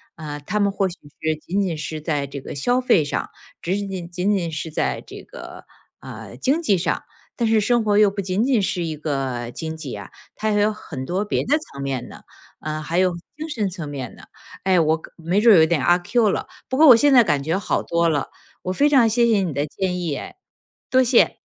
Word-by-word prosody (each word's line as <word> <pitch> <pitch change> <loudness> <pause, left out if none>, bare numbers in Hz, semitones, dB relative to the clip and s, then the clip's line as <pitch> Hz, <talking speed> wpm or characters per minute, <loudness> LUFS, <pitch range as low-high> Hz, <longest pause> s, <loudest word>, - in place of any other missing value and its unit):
啊， 150 -2 -6
他 180 +9 -3
们 200 -1 +2
或 195 -1 0
许 175 - -6 0.3
是 160 0 0
仅 185 +6 -3
仅 180 -4 -2
是 155 0 -5
在 145 -3 -2
这 140 +1 -7
个 - - -8
消 245 - +1
费 205 -10 +3
上， 145 - -3 0.3
只 180 +3 0
仅 200 -1 -3
仅 180 -3 -5
仅 190 +3 +1
仅 170 -3 -3
是 155 +1 -4
在 150 - -1
这 - - -11
个， - - -11 0.4
呃， - - -10
经 290 +6 +1
济 205 - +2
上， 170 -1 -1 0.3
但 230 -2 0
是 220 -1 +4
生 235 +2 +2
活 205 -1 +2
又 210 -2 +5
不 200 - -3
仅 190 +4 0
仅 250 -5 +2
是 180 -2 -1
一 160 -2 -3
个 135 -5 -3
经 160 +5 -5
济 150 -8 -6
啊， 100 -2 -9 0.2
它 215 0 -1
还 205 - +2
有 210 +1 +3
很 160 -10 -7
多 185 +9 -2
别 210 - -1
的 300 +3 +4
层 140 - -10
面 135 -3 -3
呢， - - -12 0.4
嗯， 155 0 -4
还 170 +4 0
有 185 -1 +3 0.2
精 315 +1 -6
神 215 -8 -1
层 170 -5 -6
面 135 -4 -6
呢。 - - -15 0.4
哎。 185 -2 +3
我 160 0 +3
可 - - -13
没 175 +5 0
准 220 -5 +7
有 160 - +7
点 160 -4 0
阿 175 +5 +5
Q 215 +4 +1
了， - - -2 0.2
不 260 - -1
过 315 - +7
我 245 - +11
现 285 +5 +4
在 245 -3 +7
感 145 -8 +1
觉 160 +6 -1
好 200 - -1
多 170 0 +1
了， 145 -4 0 0.3
我 185 - -2
非 285 +8 +3
常 255 -6 +5
谢 235 +2 +3
谢 225 -3 +3
你 180 -4 -1
的 145 +1 -1
建 180 +3 -3
议 165 -5 -2
哎， - - -8 0.6
多 260 - +5
谢。 245 -1 +3
180 Hz, 255 characters per minute, -22 LUFS, 155-215 Hz, 0.6 s, 我